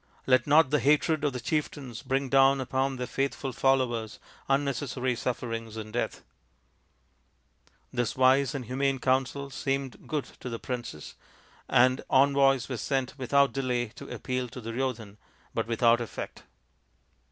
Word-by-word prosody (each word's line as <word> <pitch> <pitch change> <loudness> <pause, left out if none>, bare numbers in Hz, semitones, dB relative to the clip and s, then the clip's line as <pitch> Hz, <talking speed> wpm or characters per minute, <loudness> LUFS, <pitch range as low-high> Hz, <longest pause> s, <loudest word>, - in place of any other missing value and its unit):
Let 130 +1 +3
not 145 -1 +5
the 150 - +3
hatred 150 +3 +2
of 145 - +2
the 125 - -5
chieftains 135 -3 -3
bring 135 0 -1
down 135 +1 +5
upon 130 +1 -1
their 125 -1 -3
faithful 135 +1 -2
followers 120 -5 +1 0.3
unnecessary 135 -2 0
sufferings 115 -2 -4
and 110 0 -7
death." 120 - -2 1.7
This 120 -2 -1
wise 130 +1 +4
and 130 -3 -4
humane 135 +3 0
counsel 135 +2 0
seemed 135 -4 -3
good 150 -3 -2
to 125 - -6
the 115 - -4
princes, 120 - -6 0.6
and 130 +1 +4
envoys 135 -1 +4
were 125 - -4
sent 135 +2 -2
without 140 +2 +3
delay 125 -3 -1
to 115 - -11
appeal 130 -1 -3
to 125 - -9
Duryo 125 +3 -1
dhan, 105 -3 -13 0.4
but 115 -1 -1
without 115 0 +3
effect. 115 - -7
130 Hz, 140 wpm, -28 LUFS, 120-135 Hz, 1.7 s, not